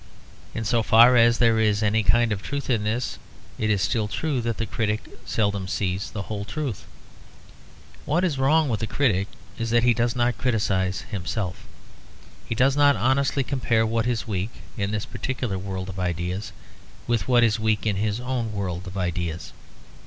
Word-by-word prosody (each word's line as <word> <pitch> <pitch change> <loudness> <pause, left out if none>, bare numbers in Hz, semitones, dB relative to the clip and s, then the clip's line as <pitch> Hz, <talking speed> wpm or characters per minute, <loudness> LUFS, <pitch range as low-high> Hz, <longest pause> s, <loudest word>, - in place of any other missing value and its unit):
In 115 - -3
so 115 +3 +2
far 115 +3 +7
as 115 0 +5
there 115 -2 +4
is 105 -1 +2
any 110 +1 +2
kind 115 +3 +3
of 100 -2 -2
truth 140 +1 -3
in 110 -4 +1
this, 105 - -2 0.4
it 110 - 0
is 100 -3 +2
still 110 -3 0
true 140 +3 -1
that 115 -1 -2
the 115 - -1
critic 110 +1 -1 0.2
seldom 100 -3 0
sees 95 0 -2
the 100 - -5
whole 100 0 -5
truth. 135 - -4 1.2
What 170 +5 +1
is 155 -7 0
wrong 155 +3 +4
with 115 -5 -1
the 110 - -2
critic 105 -9 +1 0.3
is 115 0 -2
that 120 +1 +3
he 120 -1 +5
does 120 +1 0
not 120 -1 +1
criticise 95 -6 0
himself. 90 -1 -4 0.8
He 115 - -1
does 135 +3 +3
not 145 -1 +5
honestly 135 +2 +1
compare 120 -4 +1
what 115 +1 0
is 120 -2 -1
weak, 100 0 -2 0.3
in 100 -3 -1
this 105 0 -2
particular 125 -7 -3
world 95 -1 -5
of 95 0 -7
ideas, 90 +3 -2 0.5
with 115 -5 0
what 120 -2 +5
is 115 -1 +2
weak 110 -2 0
in 105 -3 +1
his 105 +2 -1
own 125 -3 -3
world 95 -2 -4
of 95 +1 -7
ideas. 85 -2 -3
110 Hz, 180 wpm, -24 LUFS, 100-120 Hz, 1.2 s, far